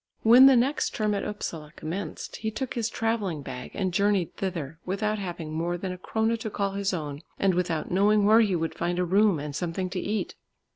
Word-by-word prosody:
When 245 +4 +9
the 270 - +7
next 260 +4 +1
term 215 -1 +1
at 200 - -1
Upsala 165 -7 -5
commenced, 175 +6 -5
he 220 - -2
took 260 +4 -4
his 230 -3 -1
travelling 210 -10 -1
bag 125 -2 -7
and 185 -2 -1
journeyed 200 -2 +1
thither, 165 -5 -4
without 210 +3 -1
having 170 -5 -5
more 170 +2 -1
than 185 +1 -4
a 180 - -6
krona 225 +4 0
to 220 - -4
call 200 -1 -1
his 200 0 -1
own, 150 -5 -4 0.2
and 195 -1 +2
without 170 -3 -1
knowing 205 +3 +4
where 220 +2 +6
he 205 -5 +2
would 165 -1 -2
find 175 +1 -2
a 180 - +1
room 195 +1 +3
and 145 -1 -5
something 180 +2 -3
to 185 - -2
eat. 210 +3 -2
195 Hz, 210 wpm, -27 LUFS, 170-215 Hz, 0.2 s, When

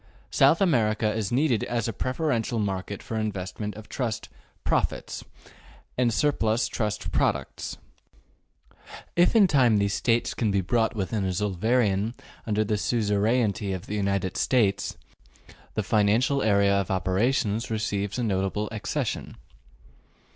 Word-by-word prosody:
South - - +4
America 110 - +2
is 110 -3 -2
needed 125 -3 +2
as 120 -2 -1
a 115 - -2
preferential 130 -4 -1
market 100 -1 -3
for 110 - -3
investment 105 0 -4
of 110 0 -10
trust 120 -4 -3 0.4
``profits'' - - -1 0.7
and 125 -2 +2
surplus 115 -3 +1
trust 105 -2 -3
products: - - -1 1.4
if 175 +6 +4
in 215 -3 +7
time 130 - +4
these 100 0 +1
states 115 +1 +1
can 110 - 0
be 100 -1 +2
brought 110 +5 +1
within 105 0 -1
a - - 0
Zollverein 105 +3 +1 0.3
under 110 0 +1
the 105 0 -1
suzerainty 105 -2 +1
of 95 +1 -5
the 105 - -6
United 100 -2 -1
States, 100 -6 +1 0.8
the - - 0
financial 110 +7 +2
area 100 -3 +3
of 100 -2 0
operations 105 +4 0
receives 105 -3 -2
a 125 - -1
notable 100 0 -1
accession. 110 -2 -3
110 Hz, 130 wpm, -26 LUFS, 100-120 Hz, 1.4 s, in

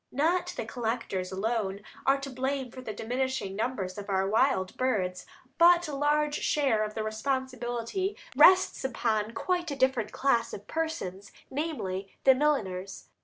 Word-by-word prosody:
Not 340 +6 +1
the - - -3
collectors 225 -5 -3
alone 200 0 -1 0.3
are 275 +1 +4
to 275 - -5
blame 260 0 -2
for 255 - -9
the 230 - -5
diminishing 245 -2 -2
numbers 205 -4 -2
of 200 0 -8
our 190 0 +1
wild 215 -3 +2
birds, 190 -8 -1 0.3
but 345 0 +6
a 300 - -5
large 295 +1 +1
share 265 -8 +2
of 215 0 -5
the 220 - -2
responsibility 255 - -2 0.2
rests 370 0 +6
upon 225 -4 -1
quite 355 -2 -1
a 285 - -3
different 260 -5 +1
class 235 -4 +1
of 205 - -7
persons, 205 - -4 0.2
namely, 200 - -3
the 265 - +8
milliners. 205 -10 -1
245 Hz, 150 wpm, -29 LUFS, 210-280 Hz, 0.3 s, the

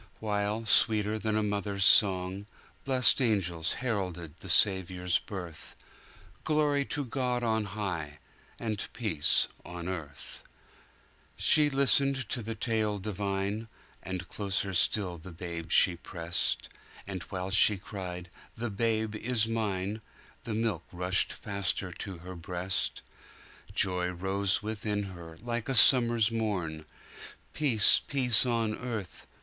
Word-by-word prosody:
While, 105 +1 -2
sweeter 110 0 +4
than 110 +1 -1
a 110 - +1
mother's 100 -1 -1
song, 95 0 +4 0.4
Blest 130 0 +4
angels 90 -8 +1
heralded 90 -9 -3
the 95 - -7
Saviour's 90 -2 +4
birth, 90 -6 -9 0.7
Glory 150 -2 +1
to 145 -1 -3
God 125 -1 -2
on 110 -2 0
high! 90 -7 -4 0.4
And 110 -3 -3
peace 85 -11 +2 0.2
on 85 0 -7
earth. 80 -6 -7 1.0
She 150 -1 +4
listened 135 -2 +2
to 120 - -2
the 115 +1 -5
tale 110 -2 -1
divine, 100 +2 -3 0.3
And 95 -1 -5
closer 100 0 -2
still 90 -1 +1
the 85 +3 -11
Babe 85 -1 -7
she 90 +1 +5
pressed:And 85 +2 -4
while 95 0 -4
she 105 +1 +5
cried, 90 -2 -7 0.3
The 120 0 -3
Babe 110 +1 -1
is 110 0 0
mine! 105 -2 -2 0.4
The 110 - -3
milk 110 -6 -1
rushed 90 +1 +1
faster 100 -2 -2
to 95 +1 -7
her 90 +2 -9
breast:Joy 90 +1 -3
rose 95 +3 -1
within 105 -1 -3
her, 85 -2 -11
like 120 0 -3
a 135 - 0
summer's 120 -2 +6
morn; 90 -9 -3 0.7
Peace, 125 -9 +4
peace 130 -4 +3
on 115 -2 0
earth! 110 -8 -6
100 Hz, 120 wpm, -29 LUFS, 90-115 Hz, 1.0 s, summer's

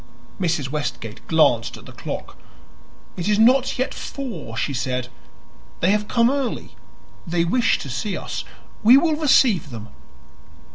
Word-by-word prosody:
Mrs. 160 -7 0
Westgate 120 -7 -5
glanced 120 -8 +3
at - - -14
the - - -11
clock. - - -6 0.8
"It 175 +3 -2
is 210 - +3
not 255 +4 +4
yet 255 +2 -1
four," 170 - -6
she 140 - -1
said; 125 0 -2 0.7
"they 185 - +3
have 210 0 0
come 235 +2 +3
early; 275 -3 -3 0.5
they 170 0 +1
wish 240 +8 +2
to - - -7
see 190 - -2
us. - - -5 0.4
We 235 +5 +8
will 315 +1 +2
receive 265 - +3
them." 115 -3 -8
180 Hz, 145 wpm, -22 LUFS, -, 0.8 s, We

